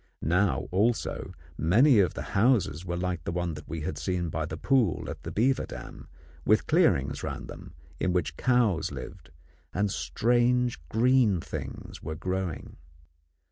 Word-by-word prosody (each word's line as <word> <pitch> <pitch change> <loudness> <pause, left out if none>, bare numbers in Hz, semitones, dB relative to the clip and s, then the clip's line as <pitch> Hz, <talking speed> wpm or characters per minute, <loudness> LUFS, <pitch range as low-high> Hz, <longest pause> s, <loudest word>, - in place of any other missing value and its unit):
Now, 90 +6 +1
also, 110 +6 0 0.3
many 115 - +5
of 95 - +2
the - - -4
houses 100 - +2
were 85 -1 -3
like 90 -3 -2
the 85 - -3
one 85 -2 -2
we 80 0 -5
had 75 0 -4
seen 85 +2 -1
by 80 0 -2
the 80 - -5
pool 120 - +1
at - - -9
the - - -6
beaver 130 +5 +1
dam, - - -9 0.4
with - - +3
clearings 70 +1 +2
round - - -5
them - - -11 0.2
in 95 - +1
which 90 -5 -1
cows 115 - +2
lived 70 +5 -9 0.5
and 100 +1 +1
strange 120 +1 +1
green 115 -4 +3
things - - -7
were 80 +2 -5
growing. 90 -2 -4
90 Hz, 150 wpm, -28 LUFS, 80-120 Hz, 0.5 s, many